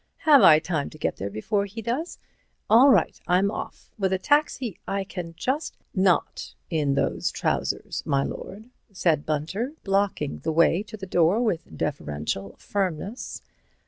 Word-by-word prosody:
Have 295 -4 +8
I 160 -6 +8
time 155 -3 -2
to - - -13
get - - -2
there 100 - -4
before 200 - -1
he 200 +3 -8
does? 245 +10 -3 0.5
All 245 +5 +8
right. 210 -10 +3
I'm 190 +3 +3
off. - - -7
With 190 -2 +1
a 190 - +2
taxi 260 - +1
I 195 0 -1
can 175 -3 -7
just—" 270 - -2 0.2
"Not 185 -2 +1 0.2
in 145 -4 +1
those 90 -12 0
trousers, - - -2
my 140 0 +1
lord," 215 - -7 0.2
said 170 -5 +1
Mr. - - -23
Bunter, 165 - -2
blocking 195 -7 0
the 160 - -2
way 170 +3 +4
to 215 +1 -9
the 190 - -7
door 180 +3 +3
with 185 -8 -2
deferential 95 - -3
firmness. 195 +3 -3
185 Hz, 160 wpm, -25 LUFS, 155-215 Hz, 0.5 s, Have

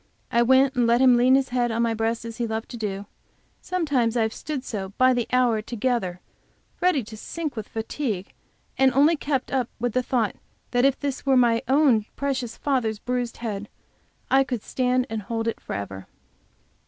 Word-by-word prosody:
I 235 - +3
went 260 +2 +4
and 245 -3 +2
let 235 +1 +4
him 255 -1 +6
lean 250 +2 +5
his 270 0 +1
head 245 -1 +1
on 230 +1 +1
my 230 -1 +1
breast, 225 +1 -1
as 230 -1 -7
he 240 -2 -1
loved 220 0 -4
to - - -7
do. 200 -2 -4 0.6
Sometimes 280 -10 0
I 230 - +3
have 220 0 -1
stood 290 -4 -5
so 200 -5 -5
by 255 0 +5
the 240 -2 -1
hour 245 -4 +3
together 215 -6 -2 0.6
ready 355 -8 +3
to 220 +1 -10
sink 305 +6 -5
with 220 -2 -5
fatigue, 225 -3 -4 0.5
and 265 0 +5
only 290 +5 +5
kept 275 -3 -2
up 255 -3 0
with 240 -1 -1
the 255 - +2
thought 240 -5 0 0.4
that 245 +1 +3
if 275 -1 +2
this 280 -2 -3
were 270 -2 +3
my 235 -2 +4
own 260 -6 +4
precious 265 -4 -2
father's 250 -6 0
bruised 245 +1 -3
head 210 -2 -4 0.6
I 270 0 +6
could 250 -5 -4
stand 255 0 +1
and 225 -3 -4
hold 225 +2 -3
it 230 - -2
forever. 95 -1 -6
245 Hz, 190 wpm, -24 LUFS, 225-265 Hz, 0.6 s, him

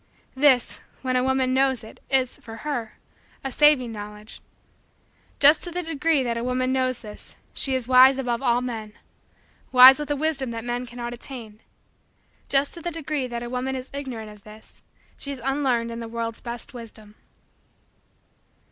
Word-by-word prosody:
This, 265 -3 +3 0.2
when 255 -1 0
a 250 - +2
woman 260 -1 +1
knows 265 -2 +2
it, 220 - -13
is, 260 -2 +1
for 225 -1 -10
her, 240 -7 -4 0.5
a 270 - -3
saving 280 -3 +4
Knowledge. 210 0 -9 1.0
Just 290 +3 +7
to 350 - -3
the 355 +1 -3
degree 320 -2 +1
that 235 -1 -2
a - - -4
woman 255 +1 0
knows 255 -1 0
this, 210 -1 -12 0.2
she 265 -2 0
is 255 -2 -2
wise 260 +1 +7
above 245 -2 -2
all 245 -2 +2
men 225 -4 -5 0.8
wise 260 +2 +9
with 295 - -5
a 290 - +1
wisdom 285 -3 -1
that 230 -1 -5
men 245 +1 -3
cannot 240 0 -6
attain. 235 -4 -10 0.9
Just 275 +1 +3
to 340 - -7
the 345 - -3
degree 305 -5 -3
that 235 -1 -5
a 240 - -6
woman 255 +1 -2
is 255 0 -7
ignorant 250 -6 -6
of 210 -1 -16
this, 215 0 -14 0.4
she 280 - -7
is 275 - -6
unlearned 260 -4 0
in 230 - -6
the 230 - -6
world's 230 0 -5
best 235 +1 -7
wisdom. 220 -3 -11
255 Hz, 175 wpm, -24 LUFS, 235-270 Hz, 1.0 s, wise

